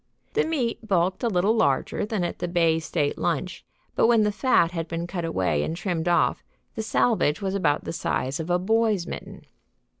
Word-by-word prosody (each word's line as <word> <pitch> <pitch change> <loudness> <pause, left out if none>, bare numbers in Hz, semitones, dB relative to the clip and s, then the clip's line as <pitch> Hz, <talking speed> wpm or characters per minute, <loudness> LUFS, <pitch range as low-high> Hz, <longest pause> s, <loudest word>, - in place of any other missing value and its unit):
The 450 - +2
meat 250 -8 -2
bulked 185 -2 +1
a 240 - +1
little 200 +1 +2
larger 140 - +1
than 210 -4 -1
at 175 - -3
the 175 - -2
Bay 165 -2 +2
State 150 -2 -2
Lunch, 180 +1 -2 0.3
but - - +4
when 230 -2 +4
the 210 - +2
fat 205 -6 +2
had 165 -2 -4
been 170 0 -3
cut 175 0 -4
away 90 - 0
and 160 - -3
trimmed 175 -3 -2
off 175 - +2 0.3
the 220 - -3
salvage 215 -8 +1
was 195 -1 -2
about 165 -7 +1
the - - -5
size 135 -4 -2
of 160 +1 -4
a 175 - +3
boy's 215 -1 +1
mitten. - - -8
180 Hz, 200 wpm, -25 LUFS, 165-215 Hz, 0.3 s, but